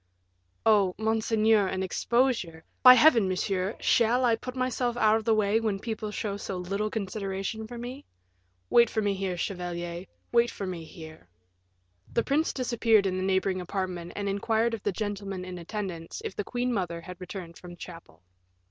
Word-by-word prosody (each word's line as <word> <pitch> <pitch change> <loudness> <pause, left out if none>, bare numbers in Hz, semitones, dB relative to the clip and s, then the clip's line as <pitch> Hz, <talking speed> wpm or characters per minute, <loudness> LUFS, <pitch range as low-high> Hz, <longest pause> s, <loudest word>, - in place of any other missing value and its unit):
"Oh, 205 -4 +4
monseigneur, 220 -1 +2
an 190 0 -2
exposure 190 -5 0
" - - -43
"By 255 -1 +10
Heaven, 240 -6 +6
monsieur, 185 +2 -1
shall 240 +2 +3
I 230 -2 +4
put 255 +3 -7
myself 255 -1 -1
out 220 -1 +4
of 220 - -6
the 225 - +4
way, 210 +1 +2
when 215 -3 -1
people 220 0 -4
show 210 -1 -3
so 195 -2 -5
little 200 +4 -2
consideration 200 +1 -4
for 240 +1 -8
me? 250 +4 -7 0.7
Wait 235 -1 +6
for 220 - -1
me 205 -1 +1
here, 190 -2 -3
chevalier, 175 -1 -4 0.3
wait 235 0 +4
for 200 - -5
me 175 -3 -5
here." 160 - -12 0.8
The 235 - +1
prince 305 +4 +1
disappeared 230 -5 +2
in 185 -1 0
the 185 - -2
neighboring 190 0 +1
apartment 180 -2 -4
and 205 -1 -3
inquired 220 +3 +1
of 225 - -4
the 205 - 0
gentleman 200 -2 -4
in 180 -1 -7
attendance 175 -2 -5
if - - -4
the 205 - -2
queen 245 +3 -2
mother 175 -5 -2
had 180 +1 -10
returned 180 -2 -8
from 175 -1 -10
chapel. 165 - -12
200 Hz, 175 wpm, -28 LUFS, 185-225 Hz, 0.8 s, By